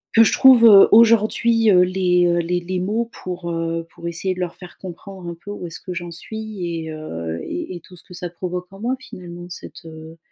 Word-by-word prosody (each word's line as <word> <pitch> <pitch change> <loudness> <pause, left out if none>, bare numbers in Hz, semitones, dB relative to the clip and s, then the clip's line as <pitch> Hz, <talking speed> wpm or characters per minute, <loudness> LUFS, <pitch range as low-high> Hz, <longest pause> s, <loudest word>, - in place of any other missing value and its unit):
que 225 - +8
je - - +2
trouve, 255 -3 +7
heu, 200 -3 +9
aujourd'hui, 225 0 +4
heu, 180 -3 +6
les, 180 -1 +2
heu, 175 0 +2
les 175 +1 -1
les 185 +1 -3
mots 215 +6 -1 0.2
pour, 175 -1 -5
heu, 165 0 -3
pour 170 - -8
essayer 175 +3 -2
de 185 - -10
leur 180 -2 -3
faire 180 -1 -13
comprendre 185 0 -9
un 170 - -6
peu 175 +5 -10
où 195 -4 -6
est-ce 165 - -9
que 185 - -7
j'en 175 0 -6
suis 215 +3 -7
et 165 -2 -4
heu 85 - -6
et 90 - -5
et - - -7
tout 180 - -16
ce 175 - -14
que 180 - -13
ça 180 0 -5
provoque 180 +1 -5
en 195 - -12
moi, 245 +5 -1
finalement, 175 -7 -10
cette, 175 0 -11
heu, 160 0 -11
180 Hz, 235 wpm, -20 LUFS, 170-200 Hz, 0.2 s, heu